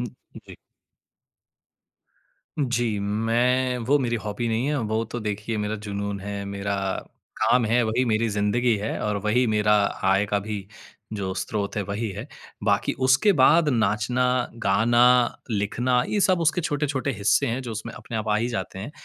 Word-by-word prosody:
हुँ, 125 - -2 0.3
उ - - -6
जी। - - -10 2.0
जी, 120 -6 0
मैं 120 +5 +1
वो 145 +1 +5
मेरी 120 -3 0
हॉबी 105 +3 -3
नहीं 115 +4 0
है, 150 -1 0
वो 110 0 -1
तो 120 - -3
देखिए 105 +1 -3
मेरा 105 +1 -2
जुनून 100 0 -3
है, 100 0 -5
मेरा 100 0 -3 0.7
काम 125 -2 +3
है, 120 +3 +3
वही 115 +4 +1
मेरी 115 0 +1
ज़िन्दगी 105 +3 +1
है, 105 +2 -3
और 105 -1 -1
वही 120 +4 +2
मेरा 105 -1 +3 0.3
आय 95 +2 +3
का 100 0 0
भी 100 -2 -4 0.5
जो 95 -3 -3
स्रोत 100 +2 -3
है, 105 - 0
वही 100 +4 -3
है। 105 +6 -7 0.4
बाकी 100 -2 +1 0.2
उसके 135 +11 +5
बाद 160 +2 +5
नाचना, 115 +1 +1 0.4
गाना, 115 +5 +4 0.4
लिखना, 120 +4 +1
ये 210 - 0
सब 185 -3 +3
उसके 160 +2 +2
छोटे-छोटे 145 -3 -1
हिस्से 100 - +2
हैं, 120 +3 -2
जो 120 -2 -5
उसमें 110 +2 -6
अपने 115 - -7
आप 110 0 -3
आ 105 - +3
ही 115 +3 0
जाते 95 -4 -4
हैं। 110 +9 -6
110 Hz, 170 wpm, -24 LUFS, 105-125 Hz, 2.0 s, वो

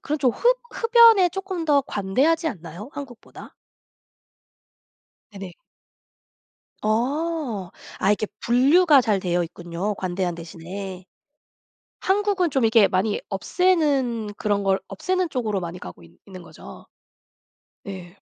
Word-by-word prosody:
그런 300 +1 -2
좀 255 -3 +3
흡 - - +2
흡연에 460 -6 +5
쪼끔 380 -2 -4
더 290 -3 +4
관대하지 275 - 0
않나요, 180 - -9
한국보다? 270 -5 -11 1.8
네네. 195 -2 -8 1.3
어. 250 - -1 0.3
아 - - 0
이렇게 210 +1 +1
분류가 280 +5 +4
잘 215 -5 +1
되어 175 -1 0
있군요, 175 +4 -5
관대한 185 -1 -2
대신에. 180 +3 -8 1.0
한국은 390 -3 +1
좀 265 -3 +1
이렇게 220 -2 +5
많이 200 +2 0
없애는 265 - 0
그런 205 -1 -1
걸 195 -1 +2
없애는 365 - -2
쪽으로 215 -7 -2
많이 175 +1 -6
가고 90 - -11
있 85 - -18
있는 185 -2 -11
거죠? - - -13 1.0
예. 185 -1 -8
220 Hz, 245 characters per minute, -23 LUFS, 190-320 Hz, 1.8 s, 흡연에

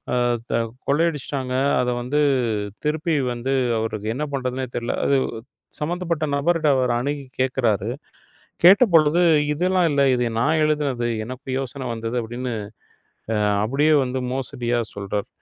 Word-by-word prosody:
ஆ, - - +1 0.4
த - - -4 0.4
கொள்ளையடித்திட்டாங்க. 140 -4 0 0.3
அதை 125 - 0
வந்து 140 +5 0 0.6
திருப்பி 155 +2 0 0.2
வந்து 120 +3 -3 0.3
அவருக்கு 110 -1 -3
என்ன 150 - -1
பண்றதுன்னே 130 -1 -2
தெரியவில்லை. 120 0 -2
அது 140 -1 +3 0.6
சம்பந்தப்பட்ட 170 0 -2
நபர் 165 +5 +2
கிட்ட 155 -2 +1
அவர் 130 -1 +1
அணுகி 140 +4 -2 0.2
கேட்குறாரு. 120 -6 +1 0.8
கேட்டபொழுது, 175 -5 +6 0.3
இதெல்லாம் 180 +2 +2
இல்லை. 140 -1 +3
இதை 125 -1 +1
நான் 155 +7 +2
எழுதியது. 145 -6 0 0.2
எனக்கு 130 +4 -9
யோசனை 135 0 -5
வந்தது 115 +1 -4
அப்படி 120 +2 -7
என்று 125 -1 -2 0.8
ஆ, - - 0 0.3
அப்படியே 145 +7 +2
வந்து 130 0 -2
மோசடியாக 120 -3 -2
சொல்கிறார். 100 0 -3
135 Hz, 130 wpm, -22 LUFS, 120-150 Hz, 0.8 s, கேட்டபொழுது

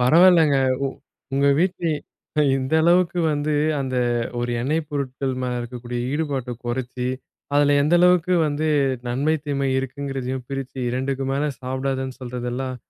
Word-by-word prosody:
பரவாயில்லங்க. 160 +2 +6 0.3
உ - - +2 0.5
உங்க 140 +1 +2
வீட்ல 180 0 0 0.7
இந்த 130 +2 -3
அளவுக்கு 175 +1 +3
வந்து 150 +1 -1 0.3
அந்த 130 -1 -2 0.4
ஒரு 120 0 -1
எண்ணெய் 155 +5 -1
பொருட்கள் 135 -2 -2
மேல 125 -1 -1
இருக்கக்கூடிய 120 0 -5
ஈடுபாட்ட 140 -5 -2
குறைச்சு, 125 +1 -3 0.5
அதுல 145 0 +4
எந்த 150 +4 +3
அளவுக்கு 180 0 +4
வந்து 150 +2 -1 0.4
நன்மை 140 +6 +1
தீமை 140 -2 -1
இருக்குங்கிறதையும் 130 -1 -4
பிரிச்சு 135 -1 -5
2டுக்கு 135 +1 -2
மேலே 145 +2 0
சாப்பிடாதன்னு 130 0 -3
சொல்றதெல்லாம் 125 +1 -4
135 Hz, 125 wpm, -23 LUFS, 130-150 Hz, 0.7 s, பரவாயில்லங்க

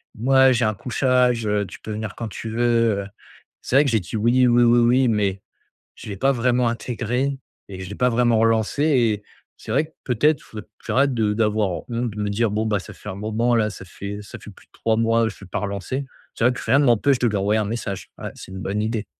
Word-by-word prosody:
moi 130 +3 +4
j'ai 120 -1 +1
un 110 - +1
couchage, 125 +1 +1
heu, 105 -1 +1
tu 90 - -11
peux 110 - -8
venir 110 -1 -5
quand 115 - -5
tu 110 - -7
veux, 115 -2 +2
heu». - - -7 0.6
C'est - - -3
vrai 140 - +6
que 135 - +1
j'ai 110 - +3
dit: 90 +3 -7
«Oui, 120 +4 +3
oui 120 0 +4
oui 120 0 +5
oui» 125 +2 +4
mais 100 -4 0 0.5
je - - -11
l'ai 100 - -5
pas 135 +8 +2
vraiment 125 -1 +1
intégré 125 +3 -2 0.3
et 95 -2 -8
je 95 - -6
l'ai 100 - -7
pas 125 0 +2
vraiment 120 -1 +2
relancé 115 +4 +1
et 120 -9 +2 0.3
c'est - - -7
vrai 145 +6 +2
que 160 - -25
peut-être, 140 +4 +2
faut 110 - -9
d - - -16 0.2
j'arrête 140 0 +2
de 110 -3 +1
d'avoir 105 -2 +1 0.2
honte, 120 0 -1
de 105 0 -7
me 105 - -1
dire: 110 +2 +1
«Bon 110 +2 -1
bah, 105 -2 +1
ça - - -11
fait - - -11
un 95 - -4
moment 110 +4 0
là, 110 -2 +2
ça 95 - -10
fait 100 +3 -7
ça 100 - -10
fait - - -11
plus 95 - -19
de - - -58
3 110 -1 0
mois 115 0 +2
je 105 - -9
l'ai 100 - -11
pas - - -3
relancé». 100 +7 -3 0.3
C'est - - -1
vrai 125 - +5
que - - -7
rien 135 - +3
m'empêche 130 0 +3
de 120 - +1
lui 105 - -1
envoyer 100 +2 +1
un - - 0
message, 100 -2 -5
ouais, - - -6
c'est - - -11
une 95 - -6
bonne 100 +3 -2
idée. 110 -1 -2
115 Hz, 255 wpm, -22 LUFS, 105-125 Hz, 0.6 s, vrai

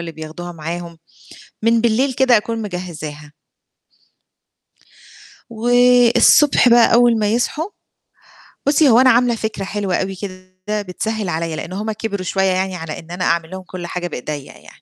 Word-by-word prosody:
اللي 170 -1 -6
بياخدوها 160 +3 -8
معاهم، 170 +1 -7 0.6
من 230 +1 +3
بالليل 240 +4 +1
كده 255 -1 +4
أكون 225 +1 -2
مجهّزاها. 155 -6 -7 2.2
والصبح 245 +3 +4
بقى 235 -1 +5
أول 235 -1 +4
ما 210 - +1
يصحوا 300 - -1 1.0
بُصّي، 290 0 +4
هو 235 0 +6
أنا 260 - +6
عاملة 240 -1 +3
فكرة 220 -3 -4
حلوة 195 -2 -2
أوي 195 0 -2
كده 185 +2 -6
بتسهل 205 +2 -4
عليَّ، 165 0 -3
لإن 175 - -7
هُم 210 +3 -3
كبروا 205 -3 -4
شوية 190 +1 -1
يعني 185 0 -1
على 160 -3 -6
إن 165 +1 -13
أنا 180 +1 -3
أعمل 170 -1 0
لهم 190 0 -7
كُلّ 180 -1 -8
حاجة 175 +1 -4
بإيديّا 145 -1 -6
يعني. - - -18
195 Hz, 150 wpm, -18 LUFS, 175-230 Hz, 2.2 s, هو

